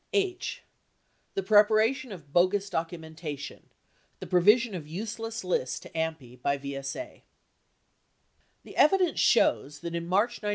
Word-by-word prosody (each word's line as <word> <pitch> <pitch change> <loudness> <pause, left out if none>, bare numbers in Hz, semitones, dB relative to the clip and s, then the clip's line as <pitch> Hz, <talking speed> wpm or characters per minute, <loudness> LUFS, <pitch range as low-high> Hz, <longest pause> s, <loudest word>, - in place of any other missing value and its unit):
H. 385 -2 -1 0.7
The 390 - -1
Preparation 220 +4 +4
of 150 -7 -11
Bogus 195 +3 +2
Documentation; 160 -3 -5 0.5
the - - -6
Provision 210 +6 +4
of 165 -5 -6
Useless 225 +6 -5
Lists 175 -8 -1
to - - -12
AMPI 160 -7 -4
by 140 +2 +1
VSA 140 - -6 1.4
The - - -12
evidence 365 +3 +4
shows 145 +1 +3
that, 170 0 -5
in 170 0 -3
March 210 +6 +1
1972. 210 - -4
180 Hz, 125 wpm, -28 LUFS, 160-225 Hz, 1.4 s, Preparation